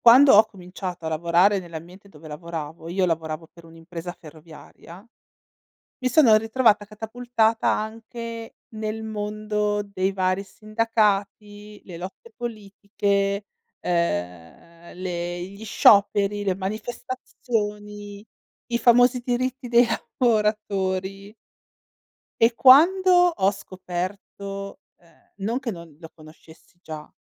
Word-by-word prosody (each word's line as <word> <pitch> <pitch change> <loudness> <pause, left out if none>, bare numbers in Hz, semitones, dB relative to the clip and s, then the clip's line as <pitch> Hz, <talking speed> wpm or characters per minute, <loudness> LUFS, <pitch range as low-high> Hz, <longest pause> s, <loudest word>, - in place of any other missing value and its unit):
Quando 260 +4 +9
ho 215 +2 +8
cominciato 180 -3 -8
a - - -1
lavorare 170 +5 +3
nell'ambiente 175 +3 -11
dove 155 -3 -14
lavoravo, 160 0 -7
io 185 +2 +1
lavoravo 160 -1 -3
per 170 -1 -16
un'impresa 165 +1 -8
ferroviaria; 165 +4 -14 0.9
mi 255 - 0
sono 250 -6 +6
ritrovata 225 -1 +2
catapultata 225 +1 -1
anche 230 +1 -5 0.2
nel 215 0 -4
mondo 210 -1 -2
dei 195 -1 -2
vari 185 0 0
sindacati, 210 -1 -2
le 180 - -9
lotte 190 - -10
politiche, 200 -2 -2 0.3
ehm, 165 - -3
le 175 -1 -4
gli 200 +4 -9
scioperi, 205 -1 +4
le 190 -2 +1
manifestazioni, 210 -1 -5 0.4
i 235 -1 -1
famosi 245 +1 +4
diritti 255 +1 -2
dei 240 0 +5 0.3
lavoratori. 200 -3 0 1.1
E 230 +1 +4
quando 345 +10 +6
ho 350 - +4
scoperto 195 +1 -6 0.2
ehm, 170 - -27
non 230 +5 -1
che 255 - -4
non 170 -6 -9
lo 165 -2 -11
conoscessi 160 +2 -18
già, 155 -3 -8
200 Hz, 105 wpm, -24 LUFS, 175-225 Hz, 1.1 s, Quando